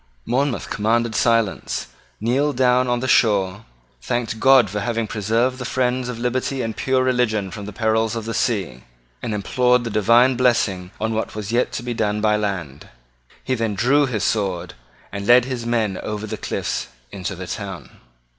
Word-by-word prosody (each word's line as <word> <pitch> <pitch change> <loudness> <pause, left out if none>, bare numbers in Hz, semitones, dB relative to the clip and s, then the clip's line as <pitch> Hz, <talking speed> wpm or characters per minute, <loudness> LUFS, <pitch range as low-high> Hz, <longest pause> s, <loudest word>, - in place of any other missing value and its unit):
Monmouth 130 +2 0
commanded 115 +2 +1
silence, 115 - +1 0.3
kneeled 130 +5 0
down 125 0 +3
on 120 0 0
the 130 - -2
shore, 105 -4 +2 0.4
thanked 115 - -2
God 130 -3 +6
for 105 +2 -3
having 115 +2 -1
preserved 115 +5 0
the - - -4
friends 125 -1 -1
of 125 - -5
liberty 125 +2 -1
and 115 -1 -3
pure 130 -1 +1
religion 115 -6 0
from 105 -2 -7
the 105 - -6
perils 110 +1 0
of 115 -2 -4
the 115 - -3
sea, 95 - -1 0.4
and 120 - -3
implored 125 +4 +2
the 115 - -4
divine 115 +5 +4
blessing 110 -7 +1
on 110 +1 -1
what 110 -1 -3
was 105 0 -5
yet 120 +2 +1
to - - -4
be 120 0 -3
done 105 -2 0
by 105 0 +2
land. 95 -10 -4 0.5
He 130 - -1
then 115 -4 -1
drew 135 +7 +3
his 110 -5 -2
sword, 95 -5 -1 0.4
and 100 0 -5
led 120 0 +6
his 125 -3 -4
men 110 -5 0
over 105 0 -4
the 110 0 -4
cliffs - - -3 0.2
into 95 0 -5
the 90 +1 -7
town. 95 -1 -7
115 Hz, 180 wpm, -21 LUFS, 105-125 Hz, 0.5 s, God